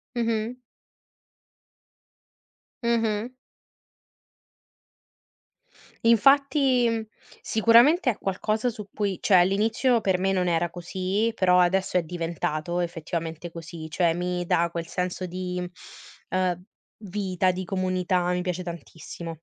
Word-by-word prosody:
Mh-mh. 230 Hz, 0 st, -1 dB, 2.3 s
Mh-mh. 230 Hz, 0 st, 0 dB, 2.7 s
Infatti, 265 Hz, +1 st, +4 dB
mhmm, 225 Hz, -1 st, -1 dB, 0.4 s
sicuramente 240 Hz, -, +5 dB
è 220 Hz, -, -5 dB
qualcosa 215 Hz, +5 st, -1 dB
su 210 Hz, -3 st, -9 dB
cui 200 Hz, -4 st, -2 dB
cioè 190 Hz, -, +4 dB
all'inizio 220 Hz, +7 st, +2 dB
per 190 Hz, -3 st, +1 dB
me 195 Hz, +1 st, +1 dB
non 180 Hz, -2 st, +1 dB
era 170 Hz, 0 st, +1 dB
così, 190 Hz, +6 st, -2 dB
però 180 Hz, -1 st, +4 dB
adesso 185 Hz, +1 st, +1 dB
è 180 Hz, -, +3 dB
diventato 165 Hz, 0 st, -3 dB
effettivamente 165 Hz, 0 st, -4 dB
così. 165 Hz, -1 st, -8 dB
Cioè 170 Hz, +1 st, +2 dB
mi 180 Hz, +1 st, -2 dB
dà 170 Hz, 0 st, +2 dB
quel 170 Hz, -1 st, -4 dB
senso 180 Hz, +1 st, -3 dB
di, 180 Hz, 0 st, -4 dB, 0.7 s
ehm, 185 Hz, -1 st, 0 dB, 0.4 s
vita, 185 Hz, -2 st, 0 dB
di 185 Hz, +1 st, -4 dB
comunità, 185 Hz, -1 st, 0 dB
mi 180 Hz, 0 st, -1 dB
piace 180 Hz, 0 st, -3 dB
tantissimo. 165 Hz, -1 st, -8 dB
185 Hz, 110 wpm, -25 LUFS, 175-220 Hz, 2.7 s, sicuramente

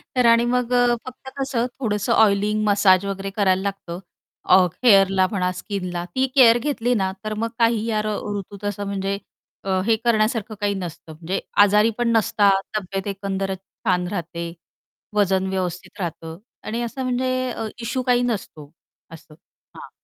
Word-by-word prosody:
तर 250 Hz, -, +3 dB
आणि 230 Hz, 0 st, +5 dB
मग 250 Hz, 0 st, 0 dB
अ, 245 Hz, -1 st, +4 dB
फक्त 255 Hz, +1 st, -9 dB
कसं 265 Hz, -3 st, -1 dB
थोडंसं 210 Hz, -1 st, 0 dB
ऑइलिंग, 210 Hz, -1 st, +3 dB
मसाज 200 Hz, -2 st, +4 dB
वगैरे 195 Hz, 0 st, -4 dB
करायला 190 Hz, -2 st, +2 dB
लागतं. 195 Hz, -3 st, -5 dB, 0.5 s
अ, -, -, +8 dB, 0.3 s
हेअरला 195 Hz, -4 st, +5 dB
म्हणा, 180 Hz, -3 st, 0 dB
स्किनला 180 Hz, -2 st, -4 dB
ती 260 Hz, 0 st, +2 dB
केअर 240 Hz, -3 st, +7 dB
घेतली 245 Hz, -2 st, -1 dB
ना, 190 Hz, -2 st, 0 dB
तर 215 Hz, 0 st, -3 dB
मग 230 Hz, -, -1 dB
काही 230 Hz, -1 st, +2 dB
यार 215 Hz, -2 st, -1 dB, 0.3 s
ऋतूत 200 Hz, +1 st, -9 dB
असं 205 Hz, 0 st, -5 dB
म्हणजे 195 Hz, 0 st, -2 dB, 0.5 s
अ, 190 Hz, -1 st, 0 dB
हे 225 Hz, 0 st, +4 dB
करण्यासारखं 220 Hz, -1 st, +1 dB
काही 205 Hz, 0 st, +1 dB
नसतं 170 Hz, -3 st, -7 dB
म्हणजे 170 Hz, +4 st, -3 dB, 0.2 s
आजारी 210 Hz, +2 st, +4 dB
पण 240 Hz, -1 st, +1 dB
नसतात 205 Hz, -3 st, +3 dB, 0.2 s
तब्येत 195 Hz, 0 st, -4 dB
एकंदरच 195 Hz, -1 st, -3 dB, 0.3 s
छान 180 Hz, -3 st, +1 dB
राहते. 170 Hz, -2 st, -5 dB, 0.6 s
वजन 190 Hz, -2 st, +2 dB
व्यवस्थित 185 Hz, +1 st, -4 dB
राहतं 165 Hz, -2 st, -5 dB, 0.3 s
आणि 230 Hz, +2 st, -3 dB
असं 240 Hz, +3 st, -4 dB
म्हणजे 255 Hz, 0 st, -1 dB
अ, 225 Hz, -, -4 dB
इश्यू 255 Hz, +3 st, -2 dB
काही 245 Hz, -1 st, +3 dB
नसतो. 175 Hz, -10 st, -4 dB, 0.4 s
असं. 160 Hz, -1 st, -13 dB, 0.4 s
हां. -, -, -10 dB
205 Hz, 155 wpm, -22 LUFS, 190-230 Hz, 0.6 s, अ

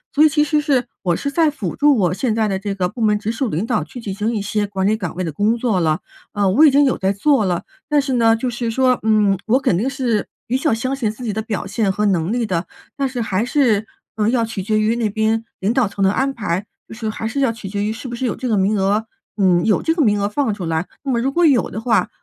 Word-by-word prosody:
所 295 Hz, -, +6 dB
以 310 Hz, -, +6 dB
其 300 Hz, 0 st, +2 dB
实 300 Hz, 0 st, +1 dB
是 275 Hz, -5 st, +1 dB, 0.2 s
我 175 Hz, -3 st, +1 dB
是 280 Hz, +8 st, -3 dB
在 320 Hz, 0 st, +3 dB
辅 210 Hz, -, -4 dB
助 290 Hz, -2 st, +4 dB
我 180 Hz, -5 st, +2 dB
现 215 Hz, +4 st, -1 dB
在 220 Hz, -1 st, +1 dB
的 195 Hz, -2 st, -1 dB
这 200 Hz, 0 st, -4 dB
个 185 Hz, -2 st, 0 dB
部 235 Hz, -, -8 dB
门 210 Hz, -1 st, +3 dB
直 210 Hz, +1 st, -3 dB
属 240 Hz, 0 st, -2 dB
领 175 Hz, +6 st, -2 dB
导 230 Hz, -2 st, 0 dB
去 245 Hz, -, -10 dB
进 205 Hz, -4 st, -5 dB
行 210 Hz, +4 st, -1 dB
一 -, -, 0 dB
些 205 Hz, 0 st, -1 dB
管 195 Hz, -1 st, -2 dB
理 210 Hz, +2 st, +3 dB
岗 180 Hz, -6 st, -5 dB
位 185 Hz, -, -2 dB
的 165 Hz, -, -3 dB
工 210 Hz, +9 st, +1 dB
作 225 Hz, -5 st, 0 dB
了， 160 Hz, 0 st, +1 dB, 0.3 s
呃， 205 Hz, -2 st, +1 dB
我 275 Hz, +11 st, +5 dB
已 310 Hz, -, +9 dB
经 285 Hz, +1 st, +5 dB
有 265 Hz, -, +2 dB
在 190 Hz, 0 st, +1 dB
做 225 Hz, +4 st, +2 dB
了。 175 Hz, -2 st, -1 dB, 0.3 s
但 295 Hz, -1 st, +3 dB
是 270 Hz, -1 st, -1 dB
呢 230 Hz, -2 st, +4 dB
就 230 Hz, +3 st, -3 dB
是 240 Hz, -1 st, -2 dB
说， 255 Hz, +2 st, +2 dB
嗯， 215 Hz, -3 st, +3 dB
我 245 Hz, +4 st, +4 dB
肯 200 Hz, -, +1 dB
定 220 Hz, +10 st, 0 dB
是 250 Hz, -6 st, -1 dB, 0.2 s
比 245 Hz, -, -2 dB
较 270 Hz, +3 st, +1 dB
相 255 Hz, +4 st, -1 dB
信 245 Hz, -6 st, -1 dB
自 220 Hz, +4 st, -8 dB
己 220 Hz, -4 st, -2 dB
的 220 Hz, -, -2 dB
表 220 Hz, -2 st, -4 dB
现 215 Hz, -5 st, 0 dB
和 210 Hz, +2 st, -1 dB
能 185 Hz, -2 st, +1 dB
力 240 Hz, -1 st, 0 dB
的， 180 Hz, -4 st, -2 dB, 0.3 s
但 275 Hz, -1 st, -1 dB
是 250 Hz, -2 st, -4 dB
还 210 Hz, -1 st, 0 dB
是， 235 Hz, -6 st, +1 dB, 0.3 s
呃， 215 Hz, 0 st, +2 dB
要 235 Hz, -1 st, +1 dB
取 225 Hz, -3 st, -5 dB
决 215 Hz, +3 st, 0 dB
于 215 Hz, +2 st, +2 dB
那 225 Hz, -3 st, 0 dB
边 220 Hz, +2 st, 0 dB, 0.2 s
领 200 Hz, +4 st, 0 dB
导 245 Hz, -4 st, +2 dB
层 195 Hz, 0 st, -3 dB
的 190 Hz, -, +4 dB
安 270 Hz, +6 st, 0 dB
排， 205 Hz, -5 st, -3 dB, 0.2 s
就 -, -, -10 dB
是 225 Hz, -1 st, -4 dB
还 220 Hz, +1 st, -4 dB
是 245 Hz, +5 st, -3 dB
要 270 Hz, -4 st, +2 dB
取 230 Hz, -3 st, -8 dB
决 200 Hz, +1 st, -2 dB
于 210 Hz, -, -1 dB
是 225 Hz, +4 st, -7 dB
不 240 Hz, -, -5 dB
是 255 Hz, +2 st, -2 dB
有 230 Hz, -, -2 dB
这 255 Hz, -, -4 dB
个 225 Hz, -, +1 dB
名 200 Hz, +2 st, +2 dB
额 205 Hz, +3 st, +1 dB, 0.3 s
嗯， 180 Hz, -3 st, +3 dB
有 215 Hz, -, +2 dB
这 325 Hz, -, 0 dB
个 325 Hz, -, +2 dB
名 205 Hz, -4 st, +2 dB
额 200 Hz, -, 0 dB
放 230 Hz, 0 st, 0 dB
出 200 Hz, -2 st, -6 dB
来， 160 Hz, +1 st, -1 dB, 0.2 s
那 275 Hz, -, -2 dB
么 240 Hz, -, +1 dB
如 265 Hz, +3 st, 0 dB
果 345 Hz, +4 st, +1 dB
有 275 Hz, -6 st, +3 dB
的 220 Hz, -, -5 dB
话， 225 Hz, -6 st, +1 dB
220 Hz, 315 characters per minute, -19 LUFS, 200-255 Hz, 0.3 s, 已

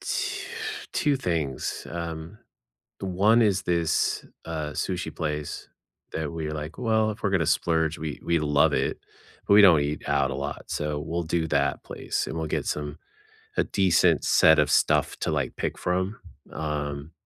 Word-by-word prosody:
tw 410 Hz, 0 st, -2 dB, 0.5 s
2 150 Hz, -5 st, +2 dB
things. 80 Hz, -, -2 dB
Um, 85 Hz, +3 st, -6 dB, 0.6 s
the -, -, -5 dB
1 105 Hz, +6 st, +4 dB
is 100 Hz, -4 st, +2 dB
this, 85 Hz, -2 st, +1 dB, 0.2 s
uh, 80 Hz, -2 st, -3 dB
sushi 90 Hz, +4 st, -3 dB
place 75 Hz, -2 st, -4 dB, 0.4 s
that 80 Hz, -2 st, -3 dB
we're 80 Hz, -2 st, -4 dB
like, 75 Hz, +1 st, -6 dB
"Well, 110 Hz, -2 st, +2 dB
if 105 Hz, -, -10 dB
we're 100 Hz, -, +2 dB
gonna 85 Hz, -5 st, +2 dB
splurge," 80 Hz, -1 st, +1 dB
we 75 Hz, -2 st, -5 dB
we 85 Hz, -, +2 dB
love 75 Hz, -1 st, +3 dB
it, -, -, 0 dB, 0.5 s
but 100 Hz, -, +5 dB
we 105 Hz, -, +9 dB
don't 85 Hz, -6 st, +8 dB
eat 75 Hz, +1 st, -2 dB
out -, -, +2 dB
a -, -, -3 dB
lot, -, -, -5 dB
so 75 Hz, 0 st, -2 dB
we'll 85 Hz, +3 st, -3 dB
do 80 Hz, 0 st, -1 dB
that 70 Hz, -2 st, +1 dB
place, -, -, -3 dB
and 80 Hz, -, -4 dB
we'll 80 Hz, -, -2 dB
get -, -, -2 dB
some 75 Hz, 0 st, -3 dB, 0.6 s
a -, -, +4 dB
decent 95 Hz, -4 st, +3 dB
set 80 Hz, -1 st, +6 dB
of 75 Hz, -, +3 dB
stuff -, -, +3 dB
to, -, -, -1 dB
like, -, -, -1 dB
pick -, -, -2 dB
from. 95 Hz, +4 st, -1 dB, 0.3 s
Um, 75 Hz, -1 st, -4 dB
80 Hz, 170 wpm, -26 LUFS, 75-95 Hz, 0.6 s, we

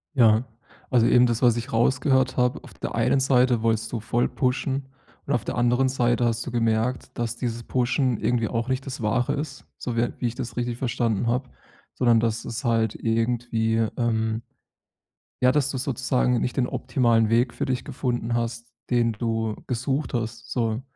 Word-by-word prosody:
Ja. 115 Hz, -2 st, +5 dB, 0.5 s
Also, 120 Hz, -3 st, +4 dB
eben 125 Hz, 0 st, +6 dB
das, 120 Hz, -2 st, 0 dB
was 120 Hz, -3 st, +5 dB
ich 120 Hz, +4 st, -5 dB
rausgehört 130 Hz, +2 st, +2 dB
habe. 125 Hz, 0 st, +1 dB
Auf -, -, -13 dB
der -, -, -5 dB
einen 135 Hz, -, +2 dB
Seite 125 Hz, -3 st, +3 dB
wolltest 115 Hz, 0 st, 0 dB
du 115 Hz, -, -2 dB
voll 120 Hz, +2 st, +1 dB
pushen 135 Hz, +1 st, -1 dB, 0.4 s
und -, -, -1 dB
auf -, -, 0 dB
der -, -, -3 dB
anderen 125 Hz, +2 st, +2 dB
Seite 120 Hz, -2 st, +1 dB
hast 115 Hz, 0 st, 0 dB
du 130 Hz, -, -5 dB
gemerkt, 115 Hz, +1 st, -1 dB
dass 120 Hz, 0 st, -2 dB
dieses 120 Hz, -2 st, -3 dB
Pushen 125 Hz, -1 st, +1 dB
irgendwie 115 Hz, -2 st, 0 dB
auch 115 Hz, +1 st, -2 dB
nicht 130 Hz, 0 st, -2 dB
das 130 Hz, -3 st, -6 dB
Wahre 125 Hz, +6 st, +1 dB
ist, 145 Hz, -1 st, -5 dB
so 120 Hz, -2 st, -4 dB
wie, 115 Hz, -, +2 dB
äh 120 Hz, -, 0 dB
wie 120 Hz, -, 0 dB
ich 115 Hz, -, -4 dB
das 120 Hz, -, -6 dB
richtig 120 Hz, -1 st, -2 dB
verstanden 115 Hz, -3 st, 0 dB
habe, 125 Hz, +2 st, 0 dB, 0.4 s
sondern 120 Hz, -2 st, +3 dB
dass 115 Hz, 0 st, -1 dB
es 120 Hz, +3 st, -5 dB
halt 115 Hz, -2 st, +1 dB
irgendwie, 115 Hz, 0 st, 0 dB, 0.2 s
ähm 110 Hz, -2 st, 0 dB, 1.0 s
ja, 125 Hz, 0 st, +5 dB
dass 145 Hz, -1 st, +1 dB
du 135 Hz, -, -3 dB
sozusagen 125 Hz, -2 st, 0 dB
nicht 125 Hz, -, -2 dB
den 125 Hz, -, +3 dB
optimalen 120 Hz, -4 st, +2 dB
Weg 120 Hz, +2 st, +2 dB
für -, -, -2 dB
dich 125 Hz, -1 st, -2 dB
gefunden 125 Hz, -4 st, -2 dB
hast, 115 Hz, 0 st, -3 dB, 0.2 s
den 120 Hz, -2 st, +2 dB
du 110 Hz, 0 st, -2 dB
gesucht 135 Hz, +4 st, -2 dB
hast, 115 Hz, 0 st, -4 dB
so. 115 Hz, -1 st, 0 dB
120 Hz, 185 wpm, -25 LUFS, 115-125 Hz, 1.0 s, eben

